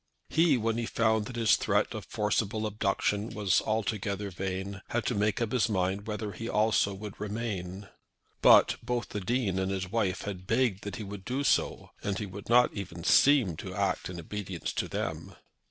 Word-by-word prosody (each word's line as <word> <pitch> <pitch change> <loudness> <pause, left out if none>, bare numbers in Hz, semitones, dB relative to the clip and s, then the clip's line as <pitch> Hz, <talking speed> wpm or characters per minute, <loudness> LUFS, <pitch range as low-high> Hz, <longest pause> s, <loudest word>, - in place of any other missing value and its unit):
He, 160 -4 +4
when 115 0 0
he 115 - -2
found 110 -2 +2
that 125 - -7
his 115 -2 +4
threat - - +1
of - - -6
forcible 105 +1 -1
abduction 105 0 0
was 100 -5 +2
altogether 105 -2 -2
vain, 95 +2 -4
had 120 -2 -1
to - - +1
make 105 -1 +1
up 115 -2 -1
his 125 -2 +2
mind 95 +1 -1
whether 105 -1 -3
he 115 +5 -6
also 105 -1 +2
would 105 0 -8
remain. 100 -3 -4 0.5
But - - +7
both 120 -1 -2
the 105 - -4
Dean 105 -2 0
and 95 0 0
his 95 -1 -3
wife 105 -4 0
had 95 -3 -6
begged 115 -4 +1
that 100 -3 -4
he 110 - -5
would 100 -1 -7
do 130 +6 -2
so, - - +1
and 100 -2 -2
he 105 - -3
would 100 +2 -9
not 125 +1 +5
even 90 -4 -6
seem 125 - +5
to - - -7
act - - -1
in 90 -1 -6
obedience 95 0 -5
to - - -1
them. - - -4
105 Hz, 190 wpm, -29 LUFS, 95-115 Hz, 0.5 s, But